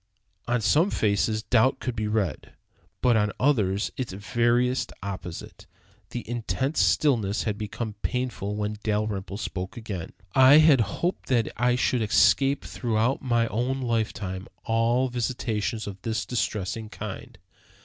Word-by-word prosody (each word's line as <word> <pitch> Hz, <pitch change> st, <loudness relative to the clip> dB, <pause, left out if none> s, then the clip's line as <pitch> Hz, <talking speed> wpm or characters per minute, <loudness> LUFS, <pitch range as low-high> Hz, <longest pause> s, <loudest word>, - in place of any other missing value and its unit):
On 120 Hz, -1 st, +1 dB
some 155 Hz, -, +3 dB
faces 110 Hz, -, +1 dB
doubt 130 Hz, +4 st, +3 dB
could 125 Hz, -2 st, -3 dB
be 110 Hz, 0 st, -2 dB
read, 105 Hz, -3 st, -2 dB, 0.5 s
but 125 Hz, -2 st, +5 dB
on 105 Hz, -1 st, +2 dB
others 105 Hz, -8 st, +1 dB
its 130 Hz, -5 st, -3 dB
veriest 120 Hz, +5 st, +1 dB
opposite. 90 Hz, -4 st, -7 dB, 0.4 s
The 120 Hz, -, -6 dB
intense 120 Hz, -, -1 dB
stillness 115 Hz, -8 st, +2 dB
had 105 Hz, -3 st, -1 dB
become 110 Hz, +1 st, -5 dB
painful 125 Hz, -5 st, -2 dB
when 105 Hz, 0 st, -3 dB
Dalrymple 105 Hz, -2 st, -2 dB
spoke 95 Hz, -2 st, -5 dB
again. 100 Hz, -7 st, -6 dB, 0.2 s
"I 130 Hz, +2 st, +8 dB
had 155 Hz, -5 st, +6 dB
hoped 170 Hz, -, -2 dB
that 120 Hz, -4 st, +2 dB
I 125 Hz, +1 st, +2 dB
should 125 Hz, -1 st, +1 dB
escape 135 Hz, +6 st, +3 dB
throughout 115 Hz, +1 st, 0 dB
my 120 Hz, -3 st, +2 dB
own 125 Hz, +4 st, -1 dB
lifetime 110 Hz, -6 st, -2 dB, 0.2 s
all 115 Hz, +3 st, +2 dB
visitations 115 Hz, -3 st, -2 dB
of 100 Hz, -2 st, -8 dB
this 110 Hz, 0 st, -2 dB
distressing 110 Hz, -2 st, -2 dB
kind. -, -, -8 dB
115 Hz, 135 wpm, -26 LUFS, 105-125 Hz, 0.5 s, I